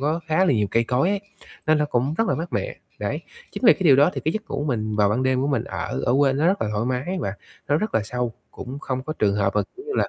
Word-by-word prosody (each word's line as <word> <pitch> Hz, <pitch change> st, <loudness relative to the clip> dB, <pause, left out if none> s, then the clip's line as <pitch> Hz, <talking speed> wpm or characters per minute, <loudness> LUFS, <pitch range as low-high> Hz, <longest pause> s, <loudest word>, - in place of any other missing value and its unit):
có 155 Hz, +4 st, 0 dB
khá 160 Hz, +3 st, +3 dB
là 165 Hz, -, +3 dB
nhiều 105 Hz, -3 st, +2 dB
cây 115 Hz, 0 st, +2 dB
cối 130 Hz, +8 st, +1 dB
ấy, 200 Hz, -1 st, 0 dB, 0.5 s
nên 155 Hz, 0 st, +4 dB
nó 150 Hz, -, +2 dB
cũng 135 Hz, +3 st, 0 dB
rất 225 Hz, -, +2 dB
là -, -, +2 dB
mát 170 Hz, +2 st, -5 dB
mẻ, -, -, -2 dB, 0.2 s
đấy. -, -, -2 dB, 0.3 s
Chính -, -, -6 dB
vì -, -, +10 dB
cái -, -, -5 dB
điều 145 Hz, -7 st, +6 dB
đó 145 Hz, +5 st, +5 dB
thì -, -, -3 dB
cái 160 Hz, -, +1 dB
giấc 215 Hz, +1 st, -5 dB
ngủ 140 Hz, +2 st, -2 dB
mình 110 Hz, -6 st, -1 dB
vào 105 Hz, -1 st, +4 dB
ban 110 Hz, +5 st, 0 dB
đêm 130 Hz, 0 st, +2 dB
của -, -, +1 dB
mình 135 Hz, -6 st, 0 dB
ở -, -, -4 dB
ở -, -, +3 dB
quê 140 Hz, -2 st, +4 dB
nó 145 Hz, +5 st, +1 dB
rất 195 Hz, +3 st, +2 dB
là 105 Hz, -, -1 dB
thoải 105 Hz, +2 st, -1 dB
mái 130 Hz, +9 st, -2 dB
và 100 Hz, -, -2 dB, 0.3 s
nó 145 Hz, -, +3 dB
rất 215 Hz, +6 st, -2 dB
là 110 Hz, -, +3 dB
sâu, 125 Hz, +1 st, -2 dB, 0.2 s
cũng 130 Hz, +3 st, -7 dB
không 130 Hz, -3 st, -3 dB
có 155 Hz, +3 st, -4 dB
trường 100 Hz, -2 st, +2 dB
hợp 100 Hz, -1 st, +1 dB
mà, 105 Hz, -, +4 dB
kiểu 390 Hz, -, -11 dB
như 435 Hz, -, -3 dB
là, -, -, +2 dB
135 Hz, 310 wpm, -23 LUFS, 115-160 Hz, 0.5 s, vì